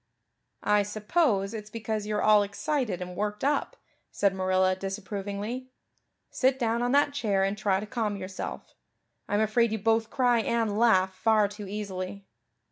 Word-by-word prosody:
"I 210 Hz, 0 st, +4 dB
suppose 210 Hz, -, 0 dB
it's 210 Hz, -1 st, -7 dB
because 220 Hz, -1 st, -3 dB
you're 210 Hz, 0 st, -1 dB
all 210 Hz, -1 st, +6 dB
excited 210 Hz, -, -2 dB
and 180 Hz, 0 st, -8 dB
worked 210 Hz, +3 st, -3 dB
up," 285 Hz, +1 st, 0 dB, 0.3 s
said 200 Hz, -1 st, +1 dB
Marilla 185 Hz, 0 st, +2 dB
disapprovingly. 200 Hz, +5 st, -5 dB, 0.6 s
"Sit 260 Hz, 0 st, +2 dB
down 235 Hz, -2 st, 0 dB
on 245 Hz, 0 st, +1 dB
that 285 Hz, 0 st, +3 dB
chair 210 Hz, -8 st, +1 dB
and 195 Hz, +1 st, 0 dB
try 200 Hz, -2 st, +1 dB
to 205 Hz, -, -5 dB
calm 210 Hz, -2 st, -2 dB
yourself. 185 Hz, 0 st, -6 dB, 0.6 s
I'm 205 Hz, +1 st, +2 dB
afraid 220 Hz, +1 st, +2 dB
you 220 Hz, -, 0 dB
both 225 Hz, +2 st, +1 dB
cry 245 Hz, -3 st, +2 dB
and 225 Hz, -2 st, 0 dB
laugh 190 Hz, -5 st, +4 dB
far 215 Hz, +1 st, +3 dB
too 205 Hz, 0 st, -8 dB
easily. 200 Hz, -1 st, -5 dB
210 Hz, 155 wpm, -28 LUFS, 195-230 Hz, 0.6 s, all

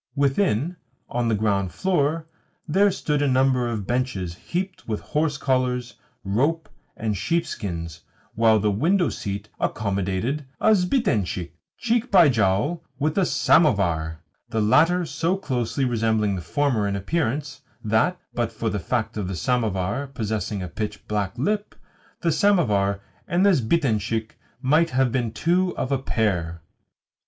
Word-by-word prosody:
Within, 140 Hz, -, +1 dB, 0.3 s
on 120 Hz, -1 st, -1 dB
the 115 Hz, -, +2 dB
ground 100 Hz, -3 st, 0 dB
floor, 160 Hz, -, 0 dB, 0.4 s
there 195 Hz, +6 st, +4 dB
stood 150 Hz, -5 st, -1 dB
a 145 Hz, -, +2 dB
number 130 Hz, -2 st, +2 dB
of 110 Hz, -4 st, -3 dB
benches 120 Hz, -8 st, -1 dB
heaped 180 Hz, -, -5 dB
with 110 Hz, -2 st, -2 dB
horse 150 Hz, -1 st, -1 dB
collars, 125 Hz, -2 st, 0 dB, 0.3 s
rope, 145 Hz, +11 st, 0 dB, 0.3 s
and 110 Hz, -2 st, -1 dB
sheepskins; 95 Hz, -, -3 dB, 0.3 s
while 110 Hz, -1 st, +4 dB
the 105 Hz, 0 st, +1 dB
window 170 Hz, -, +2 dB
seat 100 Hz, 0 st, -5 dB
accommodated 100 Hz, +7 st, -1 dB
a 220 Hz, -, +5 dB
sbitentshik, 145 Hz, -, 0 dB, 0.3 s
cheek 240 Hz, +1 st, 0 dB
by 175 Hz, -6 st, +7 dB
jowl 110 Hz, -, +1 dB
with 150 Hz, +3 st, 0 dB
a 190 Hz, -3 st, +2 dB
samovar 85 Hz, -, +2 dB, 0.3 s
the 115 Hz, -2 st, -1 dB
latter 165 Hz, +12 st, +4 dB
so 165 Hz, +6 st, -1 dB
closely 125 Hz, -, -1 dB
resembling 110 Hz, -4 st, +1 dB
the 90 Hz, -, -4 dB
former 110 Hz, -, 0 dB
in 100 Hz, -, -1 dB
appearance 140 Hz, -, -2 dB, 0.2 s
that, 110 Hz, +12 st, +1 dB
but 120 Hz, -2 st, -1 dB
for 115 Hz, 0 st, -2 dB
the 105 Hz, -, -2 dB
fact 110 Hz, +4 st, -2 dB
of 100 Hz, -3 st, -2 dB
the 95 Hz, -, -4 dB
samovar 105 Hz, -, -1 dB
possessing 110 Hz, -5 st, -3 dB
a -, -, -4 dB
pitch 105 Hz, +5 st, -5 dB
black 105 Hz, -2 st, -2 dB
lip, 205 Hz, -, -1 dB, 0.5 s
the 170 Hz, -, +2 dB
samovar 105 Hz, -, +2 dB, 0.3 s
and 185 Hz, +2 st, +2 dB
the 200 Hz, -, +6 dB
sbitentshik 115 Hz, -, 0 dB, 0.3 s
might 155 Hz, +5 st, +3 dB
have 130 Hz, -3 st, +2 dB
been 120 Hz, -3 st, -1 dB
two 180 Hz, +8 st, +1 dB
of 130 Hz, -, -2 dB
a 135 Hz, -, +2 dB
pair. 90 Hz, -, -1 dB
120 Hz, 145 wpm, -24 LUFS, 105-155 Hz, 0.5 s, by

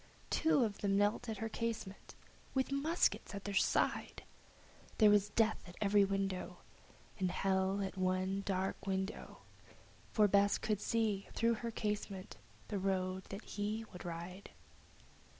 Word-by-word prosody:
Two 320 Hz, -5 st, +4 dB
of 210 Hz, -3 st, -2 dB
them 200 Hz, -1 st, +2 dB
knelt 205 Hz, +4 st, +1 dB
at 220 Hz, -, -3 dB
her 225 Hz, -, -2 dB
casement, 225 Hz, -3 st, -4 dB, 0.4 s
with 265 Hz, +1 st, +1 dB
muskets 300 Hz, +1 st, +1 dB
by 200 Hz, -, -3 dB
their 205 Hz, -, -4 dB
side; -, -, +1 dB, 0.7 s
There 215 Hz, -2 st, +7 dB
was 205 Hz, 0 st, +4 dB
Death 220 Hz, 0 st, +2 dB
at 175 Hz, -, -12 dB
every 205 Hz, 0 st, +4 dB
window, 195 Hz, -2 st, -2 dB, 0.6 s
And 185 Hz, -1 st, +1 dB
Hell 190 Hz, +2 st, +1 dB
at 190 Hz, 0 st, -5 dB
one 185 Hz, +1 st, +1 dB
dark 190 Hz, 0 st, -2 dB
window, 190 Hz, +2 st, -3 dB, 0.7 s
For 210 Hz, -2 st, +5 dB
Bess 200 Hz, 0 st, +4 dB
could 210 Hz, -2 st, -1 dB
see, 215 Hz, -4 st, 0 dB
through 230 Hz, +1 st, +2 dB
her 230 Hz, +1 st, -3 dB
casement, 210 Hz, -, -3 dB, 0.3 s
the 200 Hz, -, -1 dB
road 185 Hz, -1 st, -1 dB
that 195 Hz, +3 st, -7 dB
he 215 Hz, +2 st, -3 dB
would 180 Hz, -, -8 dB
ride. 175 Hz, +3 st, -6 dB
200 Hz, 145 wpm, -36 LUFS, 190-220 Hz, 0.7 s, There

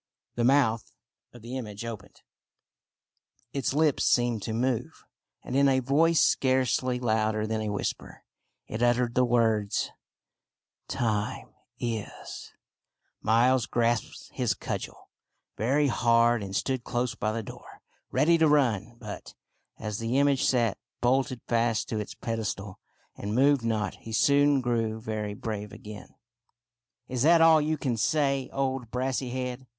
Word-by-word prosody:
The 120 Hz, -, -1 dB
mouth 120 Hz, -4 st, +2 dB, 0.4 s
of 120 Hz, -2 st, -14 dB
the 120 Hz, +2 st, -6 dB
image 105 Hz, -3 st, -6 dB
opened, 110 Hz, -4 st, -9 dB, 1.3 s
its 135 Hz, -3 st, -1 dB
lips 150 Hz, 0 st, +2 dB
seemed 120 Hz, -3 st, +2 dB
to 110 Hz, -, -4 dB
move, 120 Hz, +1 st, -2 dB, 0.4 s
and 125 Hz, -, -5 dB
in 140 Hz, 0 st, +5 dB
a 130 Hz, -1 st, +3 dB
voice 150 Hz, +6 st, +3 dB
scarcely 130 Hz, -1 st, +1 dB
louder 110 Hz, -2 st, 0 dB
than 110 Hz, 0 st, -2 dB
a 110 Hz, -, -2 dB
whisper, 105 Hz, -1 st, -4 dB, 0.4 s
it 110 Hz, -, -5 dB
uttered 120 Hz, 0 st, +2 dB
the 125 Hz, -, +3 dB
words 115 Hz, -4 st, +1 dB, 0.3 s
— -, -, -63 dB
" -, -, -66 dB, 0.2 s
Time 110 Hz, -3 st, -2 dB, 0.3 s
is! 115 Hz, -4 st, -5 dB, 0.7 s
Miles 120 Hz, +3 st, +3 dB
grasped 120 Hz, -1 st, -1 dB
his -, -, 0 dB
cudgel -, -, -6 dB, 0.4 s
very 135 Hz, +7 st, +1 dB
hard 115 Hz, -2 st, +3 dB
and 95 Hz, -1 st, -5 dB
stood 130 Hz, +1 st, -1 dB
close 120 Hz, -1 st, -1 dB
by 110 Hz, -, -2 dB
the 115 Hz, +1 st, -3 dB
door, -, -, -12 dB, 0.3 s
ready 160 Hz, +5 st, +3 dB
to 160 Hz, -, +5 dB
run. 120 Hz, -7 st, +2 dB
But, 105 Hz, -4 st, -9 dB, 0.4 s
as 105 Hz, -2 st, -4 dB
the 115 Hz, +3 st, -1 dB
image 140 Hz, -1 st, +3 dB
sat 120 Hz, -5 st, +1 dB, 0.2 s
bolted 130 Hz, 0 st, +1 dB
fast 115 Hz, -2 st, +1 dB
to 110 Hz, -, -2 dB
its 105 Hz, -, -6 dB
pedestal, 105 Hz, -4 st, -4 dB, 0.4 s
and 105 Hz, +2 st, -4 dB
moved 140 Hz, 0 st, +4 dB
not, 110 Hz, -4 st, -1 dB
he 115 Hz, -, -9 dB
soon 140 Hz, +3 st, +4 dB
grew 115 Hz, -3 st, -1 dB
very 110 Hz, -2 st, -4 dB
brave 105 Hz, -2 st, -5 dB
again. 105 Hz, 0 st, -11 dB, 0.5 s
" 120 Hz, 0 st, -62 dB
Is 125 Hz, -2 st, -3 dB
that 165 Hz, +4 st, +6 dB
all 160 Hz, -1 st, +7 dB
you 155 Hz, +1 st, 0 dB
can 130 Hz, -5 st, -2 dB
say, 140 Hz, +2 st, +1 dB
old 135 Hz, -3 st, -2 dB
Brassy 130 Hz, +1 st, -2 dB
head 125 Hz, 0 st, -4 dB
120 Hz, 145 wpm, -27 LUFS, 110-130 Hz, 1.3 s, all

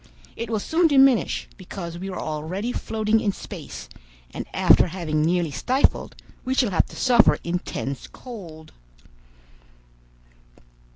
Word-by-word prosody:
It 230 Hz, -1 st, -5 dB
will 225 Hz, -, 0 dB
soon 330 Hz, -, +2 dB
diminish, 270 Hz, -5 st, +4 dB
because 175 Hz, -3 st, -7 dB
we 190 Hz, +2 st, -5 dB
are 185 Hz, -, -5 dB
already 160 Hz, +9 st, -3 dB
floating 220 Hz, -2 st, 0 dB
in 205 Hz, -, +1 dB
space, -, -, -9 dB, 0.4 s
and -, -, -6 dB
after -, -, +5 dB
having 165 Hz, -3 st, -2 dB
nearly 170 Hz, 0 st, +1 dB
stifled, 255 Hz, -, +1 dB, 0.3 s
we 260 Hz, +1 st, -1 dB
shall 245 Hz, -6 st, +2 dB
have 175 Hz, -, +2 dB
to -, -, -13 dB
suffer 240 Hz, -3 st, +5 dB
intense 170 Hz, -6 st, -4 dB
cold. 170 Hz, -11 st, -11 dB
195 Hz, 125 wpm, -24 LUFS, 170-240 Hz, 0.4 s, after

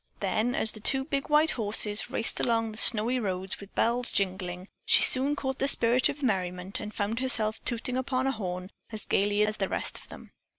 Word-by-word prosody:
Then, 240 Hz, +3 st, -2 dB
as 220 Hz, -, +2 dB
the 215 Hz, -, -9 dB
two 265 Hz, +5 st, +2 dB
big 280 Hz, -1 st, -4 dB
white 300 Hz, +1 st, +3 dB
horses 210 Hz, -2 st, +1 dB
raced 225 Hz, -, +1 dB
along 225 Hz, -2 st, -1 dB
the 215 Hz, -, -7 dB
snowy 235 Hz, +3 st, +5 dB
road 190 Hz, -3 st, -3 dB
with 200 Hz, 0 st, -14 dB
bells 240 Hz, +1 st, 0 dB
jingling, 185 Hz, -1 st, -3 dB, 0.2 s
she -, -, +5 dB
soon 275 Hz, +3 st, +4 dB
caught 265 Hz, -2 st, -5 dB
the 275 Hz, -, 0 dB
spirit 245 Hz, -1 st, +4 dB
of 290 Hz, 0 st, -7 dB
merriment 185 Hz, -4 st, -3 dB
and 210 Hz, 0 st, -7 dB
found 215 Hz, +2 st, -4 dB
herself 225 Hz, -4 st, -2 dB
tooting 245 Hz, +1 st, -1 dB
upon 260 Hz, 0 st, -2 dB
a 270 Hz, -, 0 dB
horn 185 Hz, -5 st, -6 dB, 0.2 s
as 215 Hz, -1 st, -8 dB
gayly 205 Hz, +1 st, 0 dB
as 215 Hz, 0 st, -4 dB
the 195 Hz, -, -3 dB
rest -, -, -3 dB
of -, -, -17 dB
them. -, -, -13 dB
220 Hz, 205 wpm, -27 LUFS, 200-255 Hz, 0.2 s, snowy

